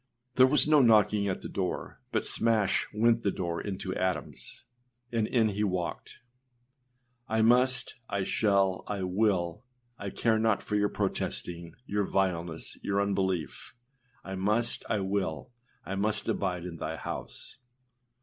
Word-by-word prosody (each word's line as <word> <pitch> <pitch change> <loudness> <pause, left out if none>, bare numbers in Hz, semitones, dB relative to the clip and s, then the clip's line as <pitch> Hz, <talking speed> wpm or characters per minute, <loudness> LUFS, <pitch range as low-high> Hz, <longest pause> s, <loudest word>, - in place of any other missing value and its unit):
â 125 -1 -49
There 130 0 +8
was 150 +2 +4
no 155 -2 +6
knocking 105 -3 +4
at 95 - -2
the - - -4
door, 95 -2 -4
but - - 0
smash 110 -4 +1
went 115 +2 +3
the 100 - +1
door 85 -3 -2
into 95 -2 -4
atoms! 90 -6 -3 0.5
and 115 -2 +1
in 115 -3 +3
he 105 +1 -1
walked: 90 -4 -3 1.1
âI 110 0 +3
must, 125 +2 +3 0.2
I 100 -1 0
shall, 95 -2 +2
I 100 -2 -2
will; 90 -1 0 0.4
I 100 - -4
care 110 +2 +1
not 110 -2 +2
for 105 - -2
your 105 0 +2
protesting 85 -3 -3
your 105 -2 0
vileness, 85 -4 -1
your 100 0 0
unbelief; 95 -2 -1 0.5
I 95 - -6
must, 105 +5 +1
I 105 -3 +1
will; 95 +1 -2 0.3
I 95 - -4
must 105 +2 -1
abide 90 -3 -1
in 85 -2 -6
thy 80 0 -4
house. - - -7
100 Hz, 150 wpm, -29 LUFS, 95-110 Hz, 1.1 s, There